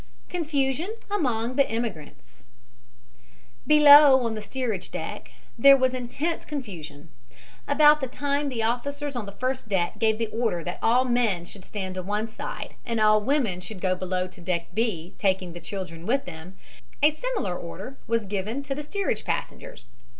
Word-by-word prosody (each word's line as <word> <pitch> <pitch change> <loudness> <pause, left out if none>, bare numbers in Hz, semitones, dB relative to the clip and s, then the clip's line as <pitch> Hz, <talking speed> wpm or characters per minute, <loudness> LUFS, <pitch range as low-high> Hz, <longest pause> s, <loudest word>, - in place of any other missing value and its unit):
CONFUSION 315 - -1 0.2
AMONG 250 - -1
THE 275 - +3
IMMIGRANTS 165 - -6 1.2
Below, 290 -3 +8
on 230 -1 -1
the 215 - -5
steerage 215 -3 -3
deck, - - -6 0.3
there 275 +3 +8
was 260 -1 +2
intense 260 +7 -3
confusion. 170 - -7 0.6
About 300 +1 +6
the 265 - -1
time 285 +2 -1
the 235 -4 -2
officers 280 +5 -2
on 230 -4 -4
the - - -6
first 255 +1 -3
deck 190 +1 0
gave 220 -1 +2
the 230 - 0
order 220 -7 -1
that 175 +2 -5
all 245 +3 +3
men 235 -8 +1
should 190 +1 -10
stand 190 -2 -5
to 185 - -4
one 210 +4 -2
side 220 - -7
and 230 -2 -2
all 215 0 +5
women 225 -7 0
should 185 +2 -8
go 185 0 +1
below 185 0 -2
to 185 -1 -12
deck 170 -1 -2
B, 195 -7 -1
taking 190 -3 0
the 175 - -8
children 175 -3 -7
with 270 +4 +1
them, 180 +2 -10 0.5
a 300 - +7
similar 310 - -3
order 195 +11 -7
was 230 -1 0
given 210 +7 -3
to 275 0 -3
the 290 - -5
steerage 390 +7 -2
passengers. - - -5
225 Hz, 165 wpm, -26 LUFS, 185-275 Hz, 1.2 s, Below